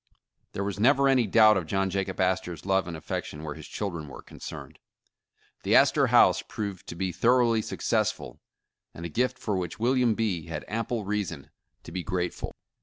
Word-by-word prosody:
There 100 - -2
was 100 0 -4
never 140 +4 +4
any 130 -4 +3
doubt 110 0 +6
of 90 -4 -3
John 95 +2 0
Jacob 95 0 -2
Astor 95 -2 0
's 80 - -15
love 95 -2 +1
and 85 -2 -5
affection 75 0 -5
where 75 -2 -4
his 80 0 -11
children 85 -7 -4
were 70 - -10
concerned. - - -10 0.8
The - - +2
Astor - - +5
House - - +5
proved 100 -4 -6
to - - -6
be 95 +1 -2
thoroughly 115 +2 +3
successful, - - -2 0.5
and 85 - -7
a - - -4
gift 125 +9 0
for 105 - -2
which 90 -3 -3
William 125 -1 +2
B. 95 -8 -1
had 80 -2 -5
ample 115 0 -2
reason 90 -8 -3 0.3
to - - -10
be 95 - -3
grateful. 90 -1 -3
95 Hz, 180 wpm, -27 LUFS, 85-110 Hz, 0.8 s, doubt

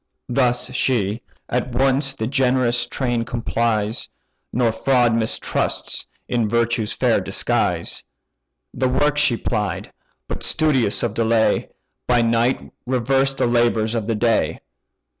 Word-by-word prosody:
"Thus 125 0 +1
she: 115 -4 0 0.3
at 125 0 -2
once 135 +2 +2
the 110 - -3
generous 125 -2 +1
train 120 -2 -1
complies, 115 -2 -1 0.4
Nor 120 -2 +2
fraud 120 0 +2
mistrusts 115 -1 -1 0.2
in 115 -3 0
virtue's 115 -1 +1
fair - - +2
disguise. - - -1 0.7
The 130 0 0
work 145 +3 +2
she 120 -5 +3
plied; 105 -5 -3 0.3
but, - - -5
studious 135 -10 +1
of 115 -3 -1
delay, 115 0 +2 0.4
By 120 -1 +3
night 115 +2 0
reversed 135 +2 +1
the - - +2
labours 120 -2 +2
of 110 -3 -2
the 115 - 0
day. 115 0 +1
120 Hz, 120 wpm, -21 LUFS, 115-130 Hz, 0.7 s, she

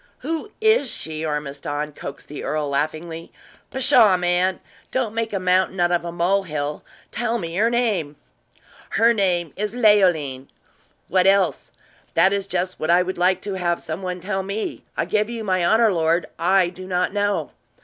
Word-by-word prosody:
"Who 325 +5 -3
is 440 - +3
she, 155 -6 -3
Ormiston?" 150 0 -3
coaxed 140 - -8
the 145 - -7
earl, 150 -1 -1
laughingly. 160 +3 -3 0.4
"Pshaw, 225 -7 +4
man! 180 +1 +1 0.3
don't 245 -5 -1
make 230 0 -2
a 195 - -1
mountain 185 0 +1
out 175 0 +3
of 175 -1 +1
a 170 - -4
mole 175 +4 +1
hill! 150 -4 -4 0.3
Tell 235 +1 -1
me 165 -5 -5
her 225 +3 +3
name!" 210 -11 0 0.8
"Her 230 +3 +5
name 180 -6 0
is 210 +2 -3
Leoline." 175 - +3 0.6
"What 185 0 +3
else?" 195 -1 +2 0.4
"That 190 - +5
is 200 -1 -2
just 185 -1 -2
what 155 - -2
I 175 +1 +5
would 185 0 -5
like 185 +1 +2
to 200 - -4
have 175 -1 0
some 160 +4 -6
one 180 -1 -4
tell 190 +1 -2
me. 200 +3 -4 0.2
I - - +1
give 210 +1 0
you 230 -2 -5
my 185 -3 +1
honor, 220 +6 +4
my 195 - 0
lord, 165 +1 +2
I 185 +1 +3
do 185 +1 -10
not 180 0 0
know." 205 0 0
185 Hz, 180 wpm, -22 LUFS, 165-205 Hz, 0.8 s, Her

